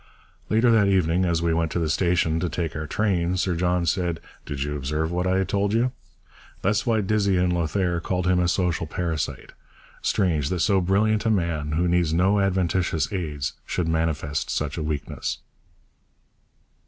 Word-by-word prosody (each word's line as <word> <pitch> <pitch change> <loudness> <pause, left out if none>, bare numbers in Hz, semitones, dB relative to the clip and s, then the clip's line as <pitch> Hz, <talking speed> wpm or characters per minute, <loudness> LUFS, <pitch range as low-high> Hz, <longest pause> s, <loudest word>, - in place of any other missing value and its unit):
Later 115 +2 +4
that 110 -3 +4
evening, 90 -2 +2
as 85 -1 0
we 85 -1 +2
went 80 -1 0
to - - -1
the 85 -2 0
station 85 -1 +1
to 90 0 -1
take 85 -2 -3
our 75 0 -4
train, 90 -1 0
Sir 95 -1 0
John 90 +1 +1
said, 85 -1 0 0.3
'Did 70 -1 -3
you 75 0 -3
observe 75 +3 -2
what 90 +1 -1
I 95 +1 +2
told 100 +3 0
you? 120 +2 +2 0.7
That's 100 +4 +1
why 110 -2 +2
Dizzy 100 -1 +1
in 90 0 +2
Lothair 85 +1 0
called 90 +1 -2
him 90 -1 +3
a 90 - +2
social 85 -2 0
parasite. 80 -2 -3 0.5
Strange 80 -8 +1
that 90 -2 -1
so 95 0 +3
brilliant 105 +4 +2
a - - +3
man, 85 -7 0
who 85 +3 +1
needs 85 -2 +2
no 95 +4 +3
adventitious 95 -3 0
aids, 75 -6 -3
should 90 -3 -2
manifest 80 -3 -1
such 75 -2 -2
a 85 - -3
weakness.' 75 -2 -3
90 Hz, 175 wpm, -24 LUFS, 80-95 Hz, 0.7 s, Later